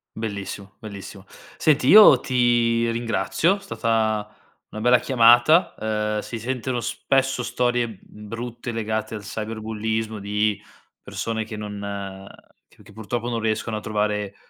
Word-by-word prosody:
Bellissimo, 100 -3 -6
bellissimo. 100 -2 -10 0.3
Senti, 150 -4 +2
io 205 - +9
ti 120 -2 +2
ringrazio, 120 - 0
stata 110 - -1 0.4
una 110 - -6
bella 125 +2 +5
chiamata, 120 +6 +5
uhm, 105 -1 -1
si 115 +2 -6
sentono 125 +1 -3
spesso 135 +2 0
storie, 120 -1 0
mhmm, 105 0 -13
brutte 120 +2 -6
legate 110 -1 -3
al 105 - -6
cyberbullismo 110 +1 -4
di 105 +1 0 0.4
persone 115 -1 -3
che 110 0 -7
non 100 -2 -6 0.4
che - - -21
che - - -17
purtroppo 115 +3 -4
non 115 -1 -2
riescono 110 0 -2
a - - -3
trovare 105 -1 -2
110 Hz, 130 wpm, -23 LUFS, 105-120 Hz, 0.4 s, io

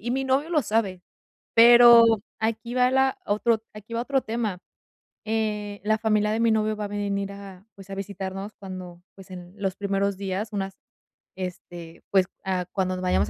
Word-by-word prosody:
y 240 - -4
mi 265 +2 -1
novio 270 +5 0
lo 315 -3 +3
sabe. 210 -6 -1 0.5
Pero 235 0 +9 0.3
aquí 225 +2 -2
va 250 0 +4
la 265 0 +2
otro 220 +2 +1
aquí 215 +2 -11
va 230 - -1
otro 270 0 0
tema, 220 -6 -3 0.6
eh, 210 -2 -2
la 215 +1 +2
familia 215 -1 +1
de 220 - -1
mi 230 0 +3
novio 215 0 +1
va 210 0 -4
a - - -3
venir 200 -1 -3
a, 200 0 -11
pues, 195 0 -14
a 195 - -5
visitarnos 195 +1 -6
cuando, 185 -3 -9
pues, 195 -1 -14
en 180 0 -10
los 195 -2 -2
primeros 200 -1 -1
días, 200 +3 -4
unas 195 -1 -4 0.6
este, 175 -2 -8
pues, 190 -2 +4 0.2
ah, 185 -1 -1
cuando 185 -2 -1
nos 185 - -5
vayamos 180 - +1
205 Hz, 180 wpm, -25 LUFS, 190-225 Hz, 0.6 s, Pero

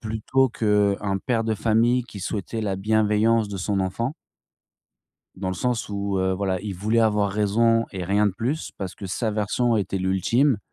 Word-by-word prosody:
Plutôt 110 +4 +1
qu'un 105 -3 +1
père 115 -2 +1
de 110 -1 0
famille 115 +3 +2
qui 100 -5 -10
souhaitait 105 +3 -3
la 100 -2 -1
bienveillance 110 +1 +2
de 100 -2 -5
son 95 +1 -1
enfant. 115 - -2 1.2
Dans 95 0 -3
le 95 - -2
sens 125 +1 -1
où, 100 -1 -2
heu, 95 0 +1
voilà, 95 -1 -1
il 100 -2 -5
voulait 110 +5 0
avoir 105 -3 +2
raison 115 +3 +2
et 95 -2 -4
rien 100 +3 +2
de 100 - 0
plus 125 +11 -3
parce 95 -2 -5
que 100 - -7
sa 110 +4 -1
version 110 +3 +1
était 95 -1 -1
l'ultime. 105 - +2
105 Hz, 180 wpm, -24 LUFS, 95-115 Hz, 1.2 s, famille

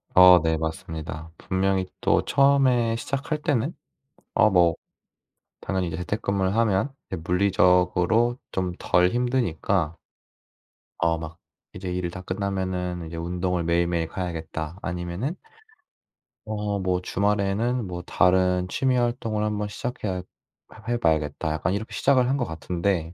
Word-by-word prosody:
어 90 -1 +9
네, 80 0 +1
맞습니다. 80 0 -5
분명히 95 0 0
또 - - +3
처음에 130 -5 +3
시작할 140 +5 -3
때는 145 -1 0 0.6
어 110 - +5
뭐 85 -3 +4 0.9
당연히 95 -2 -1
이제 - - -4
재택근무를 100 0 -1
하면 115 +3 +2 0.2
이게 95 - -2
물리적으로 90 +5 +3
좀 90 -1 -2
덜 90 0 +3
힘드니까 100 -9 0 1.1
어 80 0 +2
막 80 +1 -8 0.4
'이제 95 -1 -5
일을 90 -1 -2
다 95 - -7
끝나면은 90 -2 -3
이제 85 +1 -7
운동을 90 +1 -1
매일매일 85 0 +1
가야겠다.' 80 -2 -5
아니면은 90 - -3 1.1
어 105 -1 -2
뭐 90 -1 0
'주말에는 105 +4 0
뭐 90 -1 -5
다른 90 +1 +2
취미 130 +6 +1
활동을 120 -3 0
한번 105 -1 -1
시작해야 105 -3 -4
해 90 - -5 0.7
해 120 - +1
봐야겠다.' 80 -1 0
약간 85 +4 -1
이렇게 110 +2 -4
시작을 130 -3 +3
한 135 - +2
것 135 - 0
같은데 85 +1 -2
95 Hz, 290 characters per minute, -25 LUFS, 85-110 Hz, 1.1 s, 어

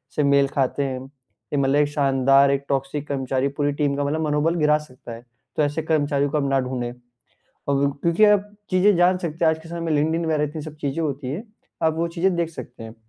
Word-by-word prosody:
से 150 - +2
मेल 140 0 +4
खाते 135 +1 -1
हैं? 130 -1 -5 0.4
ए - - +1
मतलब 135 0 +2
एक 145 0 +3
शानदार 135 -1 +3
एक 140 0 0
टॉक्सिक 140 +1 -2
कर्मचारी 135 -1 -1
पूरी 145 0 +1
टीम 145 -1 0
का 145 - -1
मतलब 150 +3 -1
मनोबल 150 +3 +1
गिरा 150 -2 +3
सकता 130 -5 -12
है, 115 +1 -11 0.3
तो 155 - +2
ऐसे 150 +2 -1
कर्मचारियों 145 -3 +1
को 150 - 0
आप 145 - 0
ना 135 0 +2
ढूँढ़ें। 125 -2 -3
अ, - - -10 0.8
क्यों 140 0 +2
क्योंकि 170 +8 +2
आप 210 -1 +3 0.2
चीजें 190 +2 +4
जान 180 +1 +4
सकते 165 -2 -3
हैं 160 - +6
आज 160 - -2
के 165 - -12
समय 170 0 -5
में 165 -1 -1
लिंक्डइन 160 +3 +1
वगैरह 155 -2 +1
इतनी 150 +1 -5
सब 155 0 -9
चीजें 140 +2 -2
होती 140 -3 -3
हैं, 160 +10 -4 0.4
आप 160 -1 +2
वो 165 +1 0
चीजें 180 +2 0
देख 170 -1 -1
सकते 120 -7 -10
हैं, 110 0 -10
145 Hz, 235 wpm, -23 LUFS, 135-160 Hz, 0.8 s, हैं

